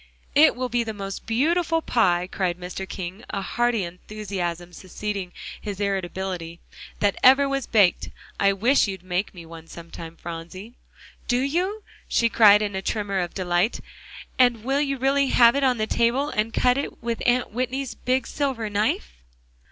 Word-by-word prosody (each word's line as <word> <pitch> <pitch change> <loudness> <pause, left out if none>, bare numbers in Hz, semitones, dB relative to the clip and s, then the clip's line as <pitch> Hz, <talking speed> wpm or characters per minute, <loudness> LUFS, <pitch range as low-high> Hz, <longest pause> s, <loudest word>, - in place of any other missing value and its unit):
"It 300 +3 +6
will 255 +1 -2
be 240 0 0
the 220 -1 -5
most 195 0 -6
beautiful 325 +8 +1
pie," 180 - +2
cried 180 -2 -1
Mr. 185 +2 -6
King, 185 +2 -6
a 195 - -3
hearty 240 -1 0
enthusiasm 180 -1 -5
succeeding 195 0 -5 0.3
his 205 -2 -6
irritability, 185 -3 -3 0.4
"that 205 -1 +2
ever 270 +2 +6
was 275 -1 -2
baked. 205 -5 +3 0.3
I 200 0 +4
wish 225 +7 +3
you'd 190 -2 -6
make 185 +2 -2
me 170 -2 -10
one 165 0 -12
sometime, 165 -1 -10
Phronsie." 175 +6 -8 0.5
"Do 245 - +2
you?" 365 +10 -1 0.2
she 230 - +2
cried 210 -2 +6
in 205 -1 -3
a 190 - -2
tremor 200 -1 -2
of 175 -1 -3
delight, 180 +3 0 0.6
"and 240 -3 +4
will 270 +3 +1
you 275 -2 -1
really 275 +2 +2
have 240 -1 +5
it 280 - +1
on 255 -2 +3
the 215 - 0
table, 240 +6 +1
and 215 +2 -1
cut 250 +3 +2
it 285 - -6
with 235 -1 -2
Aunt 245 0 +2
Whitney's 255 +3 -3
big 255 +1 -1
silver 260 -7 -2
knife?" 205 - 0
215 Hz, 165 wpm, -24 LUFS, 185-255 Hz, 0.6 s, It